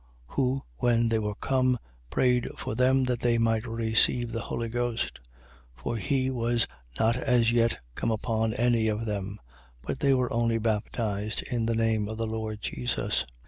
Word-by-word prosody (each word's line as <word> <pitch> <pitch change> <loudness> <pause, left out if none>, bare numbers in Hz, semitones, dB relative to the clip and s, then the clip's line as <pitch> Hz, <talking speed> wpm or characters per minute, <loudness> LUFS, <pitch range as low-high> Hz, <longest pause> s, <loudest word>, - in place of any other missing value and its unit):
8:15. - - -16
Who, 135 0 +1
when 115 - +3
they 115 -1 +2
were 105 -1 -2
come, 130 +1 +2 0.3
prayed 125 - +2
for - - -4
them 130 +3 +3
that 125 -2 0
they 120 -1 +2
might 115 0 +1
receive 115 +1 +2
the 115 0 -2
Holy 115 +3 -3
Ghost. 120 - -2 0.6
8:16. - - -19
For 115 - -1
he 130 +6 0
was 120 -2 +1 0.3
not 115 +2 +3
as 120 -2 +3
yet 115 -1 +3 0.2
come - - -1
upon 110 0 0
any 120 -2 +3
of 110 +1 -1
them: 100 -1 -3 0.5
but 130 - -3
they 140 -1 +4
were 125 -1 0
only 115 0 +2
baptized 105 -1 -1
in 115 -2 -1
the 115 - +1
name 110 -2 +1
of 110 +1 -5
the 115 - -1
Lord 110 -1 -4
Jesus. 65 0 -1
115 Hz, 180 wpm, -28 LUFS, 110-120 Hz, 0.6 s, they